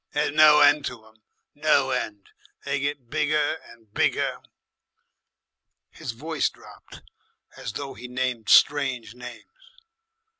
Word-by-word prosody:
There's 150 0 0
no 150 0 +6
end 145 0 +5
to 115 -3 -7
'em. 110 0 -23 0.3
No 145 -3 +2
end. 105 -5 -4 0.3
They - - -1
get 140 -4 -4
bigger 150 0 0
and 110 -3 -19
bigger." - - 0 1.5
His 125 - -6
voice 155 +5 -2
dropped - - -16 0.5
as - - -7
though 140 -1 -6
he 125 +4 -10
named 125 -3 -3
strange 135 -6 +3
names. 125 -1 -10
135 Hz, 120 wpm, -25 LUFS, 120-150 Hz, 1.5 s, no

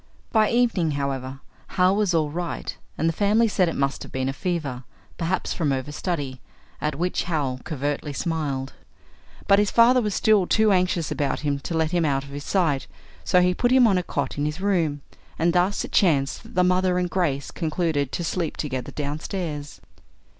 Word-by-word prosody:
By 215 -2 +4
evening, 225 -10 +2
however, 135 -1 -3 0.4
Hal 185 +1 +4
was 200 -4 +1
all 155 -2 +1
right, 175 +2 -4 0.2
and 165 - +1
the 165 - +1
family 210 +5 +3
said 185 -4 +2
it - - -4
must 135 0 -1
have - - -9
been 130 0 -1
a - - -2
fever, 140 -5 -3 0.4
perhaps 175 +3 -1
from 155 -4 -1
overstudy, 140 0 -3 0.4
at 150 -1 -1
which 180 +5 -1
Hal 145 -7 -1
covertly 145 0 -3
smiled. 140 -4 -2 0.7
But 200 0 +6
his 205 -1 +2
father 245 +2 +5
was 210 -3 -1
still 210 -4 +3
too 220 -1 +3
anxious 180 -3 +1
about 140 -2 -1
him 145 -1 -1
to 160 +5 -3
let 160 0 +1
him 175 -2 +1
out 135 -3 +1
of 140 - -12
his 145 +1 -6
sight, 155 -8 +1 0.4
so 180 - +4
he 180 0 +3
put 245 +6 +1
him 255 -1 +6
on 195 -5 +4
a - - -1
cot 145 -4 -3
in 145 - +1
his 150 +4 -4
room, 165 -8 0 0.3
and 170 +1 +2
thus 180 +3 +1
it - - -11
chanced 140 -8 +2
that - - -15
the 180 - +4
mother 180 0 +2
and 180 0 +1
Grace 170 -7 -1
concluded 155 -4 -1
to 175 - -3
sleep 165 0 -2
together 130 -4 -4
downstairs. 150 +1 -4
165 Hz, 190 wpm, -24 LUFS, 145-185 Hz, 0.7 s, But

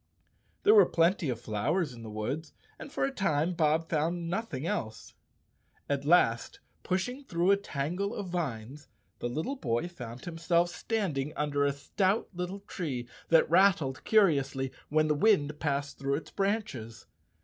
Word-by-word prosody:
There 425 - +7
were 425 - +8
plenty 170 -2 +2
of 120 -2 -2
flowers 130 - -1
in 115 - -11
the 110 - -8
woods, 125 +9 -4 0.3
and - - -9
for 315 - -2
a 275 - -1
time 175 - 0
Bob 160 0 +2
found 165 +2 -1
nothing 175 - -3
else. 130 - -4 0.7
At 140 -1 -1
last 145 -8 +3 0.2
pushing 245 +9 -2
through 175 -5 +1
a - - +7
tangle 185 +4 -3
of 190 - -5
vines, 145 -5 -4 0.3
the 120 - -2
little 160 - -2
boy 120 - -1
found 120 -8 -9
himself 170 0 +1
standing 175 -9 -2
under 145 -1 0
a 140 - +3
stout 185 +9 0
little 180 +3 -4
tree 135 -11 -4 0.2
that 165 -1 +5
rattled 170 -7 +3
curiously 140 -10 +2 0.2
when 155 +1 +3
the 150 - +3
wind 150 -4 +2
passed 140 -2 -2
through 140 0 0
its 155 - -6
branches. 195 - -2
160 Hz, 155 wpm, -30 LUFS, 140-185 Hz, 0.7 s, were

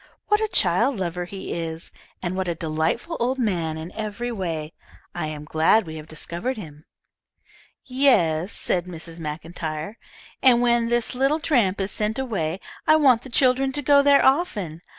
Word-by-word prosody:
What 420 +1 +3
a 435 - +1
child 280 -9 +3
lover 180 -1 -3
he 190 +2 -6
is, 165 0 -5 0.3
and 180 0 -2
what 190 -1 -2
a 170 - -1
delightful 160 - -2
old 255 +3 0
man 175 -10 -1
in 160 +3 -7
every 220 +3 -4
way! 165 -7 -4 0.4
I - - -3
am 150 -1 -6
glad 160 +8 +3
we 160 -1 -7
have 155 0 -9
discovered 170 +11 -5
him." 155 -6 -10 1.0
"Yes," 205 - +2
said 175 -2 0
Mrs. 165 -1 -8
Maclntyre; 160 +4 -5 0.4
"and 250 -2 +6
when 235 -1 +2
this 240 -1 0
little 270 +5 +1
tramp 235 - +1
is 195 +1 -2
sent 215 +1 -1
away, 195 -10 -2 0.3
I 310 - +7
want 265 -7 +4
the 260 - -11
children 260 +2 +2
to 290 - 0
go 285 +1 +6
there 280 0 +5
often. 210 - +1
195 Hz, 170 wpm, -23 LUFS, 165-255 Hz, 1.0 s, I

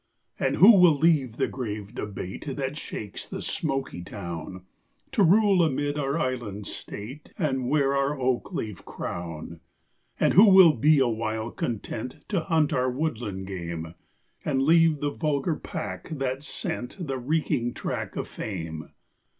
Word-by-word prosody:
And - - +1
who 195 +9 +9
will 170 -5 +6
leave 140 -7 +2
the - - +1
grave 105 -5 -5
debate 105 +6 -5
That 135 0 -2
shakes 105 -8 -6
the - - -6
smoky 135 - -2
town, 90 0 -7 0.5
To 245 - +1
rule 195 +1 +5
amid 145 -2 0
our 140 +2 0
island 120 -8 -3
state, 130 +12 -7
And 130 -7 0
wear 140 -1 +2
our 140 +1 0
oak 130 -1 0
leaf 105 -5 -5
crown? 85 -1 -6 0.6
And - - +3
who 205 +4 +8
will 190 -4 +8
be 150 +5 +4
awhile 115 -3 0
content 115 +1 -5
To 195 - +1
hunt 160 -3 +1
our 130 0 +2
woodland 120 -9 -3
game, 85 -3 -5 0.5
And 135 -3 +1
leave 165 0 +4
the 145 0 0
vulgar 155 +1 0
pack 160 +2 -6
that 135 -4 -2
scent 150 -3 -5
The 135 -7 -3
reeking 125 -3 0
track - - -4
of - - -3
fame? 80 -6 -6
135 Hz, 145 wpm, -26 LUFS, 105-155 Hz, 0.6 s, who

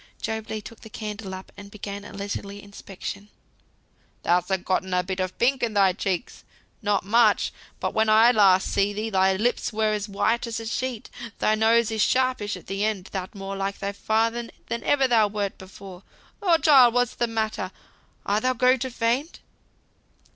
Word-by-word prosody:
Job 220 -1 -4
Legh 215 -1 -4
took 230 - -11
the 220 - -12
candle 210 -2 -6
up, 185 - -11
and 200 0 -11
began 200 -1 -7
a - - -10
leisurely 200 0 -5
inspection. 200 0 -8 0.9
"Thou 175 +1 +3
hast 185 0 -3
getten 185 0 0
a 180 - +2
bit 190 +1 -4
of 185 -1 -3
pink 260 +3 +2
in 225 -3 -1
thy 195 -2 +4
cheeks, 190 +3 -3 0.4
not 205 -3 0
much; 220 0 +3 0.3
but - - -2
when 220 0 +2
last 225 +3 +6
I 195 -3 +6
saw 190 - -1
thee, 220 +2 -3
thy 190 0 +3
lips 235 +6 0
were 215 -1 +1
as 210 0 -3
white 230 +4 0
as 230 0 -3
a 225 - -7
sheet. 245 0 -4 0.3
Thy 215 - +2
nose 225 +1 +3
is 220 -1 -1
sharpish 255 -5 +1
at 180 - -14
th' - - -10
end; 210 -3 -1
thou'rt 190 +1 -5
more 195 0 -5
like 195 0 -3
thy 200 0 -3
father 225 +3 0 0.2
than 235 - -3
ever 275 -2 +3
thou 225 -4 +4
wert 205 -1 -3
before. 190 -1 -11 0.4
Lord! 345 -5 +3
child, 260 -6 +7
what's 245 -1 +2
the 240 - -1
matter? 220 -4 -2 0.6
Art 205 +2 +1
thou 255 +2 +2
going 255 +1 +3
to 260 +2 -3
faint?" 245 +6 -1
215 Hz, 190 wpm, -25 LUFS, 195-230 Hz, 0.9 s, child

